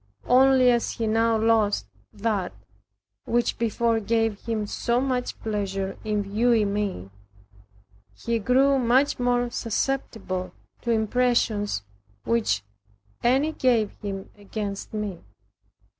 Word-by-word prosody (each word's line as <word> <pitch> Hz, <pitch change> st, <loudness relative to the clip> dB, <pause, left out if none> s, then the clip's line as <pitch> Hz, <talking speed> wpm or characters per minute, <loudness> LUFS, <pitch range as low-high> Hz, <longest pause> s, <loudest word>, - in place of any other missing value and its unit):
Only 260 Hz, 0 st, +5 dB
as 235 Hz, -1 st, 0 dB
he 230 Hz, -, -3 dB
now 225 Hz, +1 st, +2 dB
lost 220 Hz, -2 st, +2 dB, 0.3 s
that, 205 Hz, -3 st, -2 dB, 0.7 s
which 240 Hz, 0 st, 0 dB
before 230 Hz, 0 st, +1 dB
gave 225 Hz, -1 st, 0 dB
him 225 Hz, -2 st, -1 dB
so 235 Hz, +3 st, 0 dB
much 255 Hz, -2 st, -2 dB
pleasure 195 Hz, -3 st, -2 dB
in 210 Hz, -1 st, 0 dB
viewing 215 Hz, 0 st, +2 dB
me, 195 Hz, -, -3 dB, 1.0 s
he 230 Hz, -, -2 dB
grew 265 Hz, +5 st, +3 dB
much 255 Hz, +4 st, +2 dB
more 245 Hz, -1 st, +1 dB
susceptible 220 Hz, -7 st, -2 dB, 0.3 s
to 235 Hz, -, -5 dB
impressions 220 Hz, -, +1 dB, 0.4 s
which 215 Hz, -, +1 dB, 0.6 s
any 270 Hz, +6 st, +3 dB
gave 240 Hz, -8 st, +2 dB
him 195 Hz, -2 st, -5 dB
against 205 Hz, -1 st, -5 dB
me. 210 Hz, -5 st, -4 dB
225 Hz, 110 wpm, -25 LUFS, 205-245 Hz, 1.0 s, Only